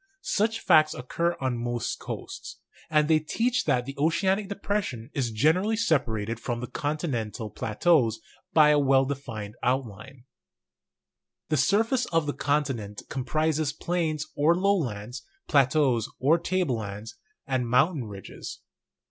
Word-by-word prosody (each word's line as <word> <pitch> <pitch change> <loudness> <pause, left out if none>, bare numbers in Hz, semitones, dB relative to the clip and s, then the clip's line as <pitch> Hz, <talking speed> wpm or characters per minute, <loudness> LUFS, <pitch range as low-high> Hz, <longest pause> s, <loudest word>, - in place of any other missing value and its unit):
Such 225 +2 0
facts 155 -3 +5
occur 170 +7 -1
on 130 -3 -1
most 120 -1 -2
coasts; - - -7 0.3
and 150 -1 +3
they 160 -1 +4
teach 235 +11 0
that 125 -5 +1
the 135 +1 -7
oceanic 190 +6 +1
depression 200 - -3
is 130 -5 -1
generally 160 - +2
separated 115 - 0
from 120 0 -3
the 125 - -4
continental 125 -8 -3
plateaus 115 -1 +2 0.3
by 155 -2 +6
a 150 -1 +5
well 135 -1 +4
defined 115 -7 -5
outline. 125 0 -3 1.3
The 155 - +2
surface 225 - +2
of 165 -2 +1
the 145 - -2
continent 135 -9 -2
comprises 155 +3 0
plains 155 -2 -1
or 155 +4 +4
low 200 +3 +3
lands, 120 - -4 0.3
plateaus 135 -5 +3
or 155 +6 +4
table 175 -8 0
lands, 105 +2 -7 0.3
and 130 -3 -1
mountain 140 +2 +2
ridges. 100 -3 -9
140 Hz, 130 wpm, -27 LUFS, 120-165 Hz, 1.3 s, by